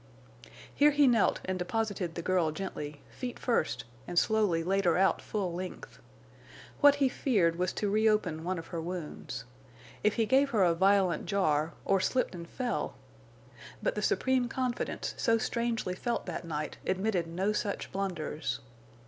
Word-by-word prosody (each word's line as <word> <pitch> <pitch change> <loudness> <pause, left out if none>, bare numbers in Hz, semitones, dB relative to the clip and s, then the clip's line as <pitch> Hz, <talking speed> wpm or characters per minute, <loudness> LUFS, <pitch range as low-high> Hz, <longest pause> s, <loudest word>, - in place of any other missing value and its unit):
Here 295 +1 +5
he 290 0 +4
knelt 235 -5 +3
and 185 0 -2
deposited 195 -3 -2
the 170 - -4
girl 180 -3 +2
gently, 150 -4 -6
feet 250 -1 -5
first 235 -10 0 0.2
and 175 - -5
slowly 205 -6 +3
laid 195 +2 +1
her 170 -1 +4
out 195 +1 +3
full 195 -5 -2
length. 180 +1 -7 0.8
What 285 0 +7
he 280 -2 +3
feared 195 - +1
was 180 +1 0
to 210 - -1
reopen 210 -6 +2
one 185 +2 -1
of 165 - -6
her 165 - -2
wounds. 160 -8 -6 0.6
If 210 - +3
he 225 - +2
gave 270 +5 +4
her 215 -7 +3
a 175 -2 +4
violent 190 0 +3
jar, 165 -5 +1
or 195 - +3
slipped 255 +4 0
and 170 -1 -8
fell! 250 -2 -2 0.9
But - - +1
the - - -3
supreme 260 - +2
confidence 250 -1 -2
so 230 -1 +3
strangely 230 -4 -1
felt 235 +6 -2
that - - -5
night 150 -2 -4
admitted 190 -2 0
no 190 +5 0
such 205 -1 -3
blunders. 175 -6 -3
195 Hz, 160 wpm, -30 LUFS, 170-230 Hz, 0.9 s, What